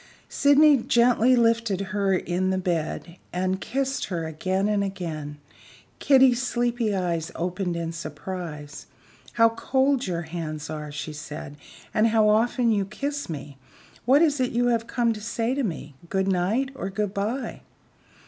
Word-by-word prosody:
Sydney 285 +1 +5
gently 240 +1 +4
lifted 230 -4 +2
her 200 -2 +2
in 185 +1 -1
the 190 - +1
bed, 175 -1 -3
and 185 +1 -1
kissed 270 +2 -2
her 170 -3 -3
again 185 +5 -1
and 205 -1 +1
again. 160 -7 -5 0.6
Kitty's 260 -3 +5
sleepy 240 -3 0
eyes 170 -3 -2
opened 180 +1 -2
in 165 -1 -3
surprise. 155 -2 -7 0.5
"How 230 -1 +5
cold 265 +3 +1
your 170 -2 -2
hands 160 -2 -5
are!" 150 -1 -5
she 150 +1 -5
said; 150 -1 -8 0.4
"and 215 +1 +4
how 220 -1 +3
often 230 +2 +3
you 205 -2 +2
kiss 280 +7 -4
me. 145 -3 -7 0.5
What 275 +6 +5
is 295 -4 +2
it 255 -1 0
you 245 +1 +2
have 230 -1 0
come 235 -1 +1
to 210 - -8
say 230 +2 -1
to 280 - -1
me 160 - -4 0.2
good 190 0 0
night 195 +9 +1
or 195 -7 -5
good 200 0 -2
by?" 215 +7 -3
200 Hz, 155 wpm, -25 LUFS, 170-240 Hz, 0.6 s, Sydney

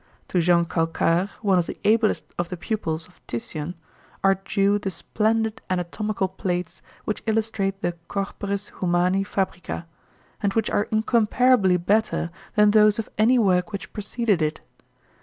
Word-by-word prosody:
To 180 - +2
Jean 170 0 +4
Calcar, 165 +2 +1
one 195 -3 +4
of 170 - -1
the - - -6
ablest 220 0 +3
of 175 0 -1
the 180 - -5
pupils 170 -4 -3
of 180 - -24
Titian, 150 +8 -4 0.5
are 195 0 +6
due 200 +1 +2
the 200 - -3
splendid 220 +5 -1
anatomical 190 +3 -1
plates 180 -2 -3 0.2
which 215 - -2
illustrate 215 -3 -1
the 175 - +1 0.2
"Corporis 200 0 -3
Humani 180 +2 +2
Fabrica," 190 -3 -3 0.6
and 200 -2 +1
which 225 -2 +1
are 205 - +1
incomparably 220 -2 +3
better 195 -1 +1 0.2
than 210 -1 +5
those 210 -1 +5
of 225 - -4
any 240 +4 +5
work 185 -3 +2
which 200 - -6
preceded 210 -2 0
it. 155 0 0
195 Hz, 145 wpm, -24 LUFS, 175-215 Hz, 0.6 s, are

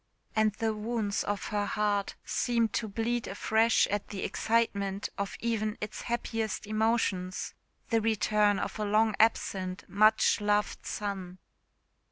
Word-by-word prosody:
And 215 0 +3
the 220 +1 -1
wounds 215 -1 -1
of 205 -1 -3
her 205 -1 0
heart 205 -1 0
seemed 230 -3 +1
to 220 - -1
bleed 230 +3 -1
afresh 220 +3 +3
at 205 0 -2
the 195 -2 -5
excitement 200 -3 0
of 200 -1 -4
even 220 -2 -1
its 210 0 -5
happiest 225 -3 -2
emotions 215 -4 0 0.4
the 225 -1 +3
return 210 -1 +2
of - - -4
a - - 0
long 215 +1 +3
absent, 190 -4 +1
much 215 +1 +4
loved 210 0 0
son. 190 -3 -4
210 Hz, 135 wpm, -30 LUFS, 200-225 Hz, 0.4 s, much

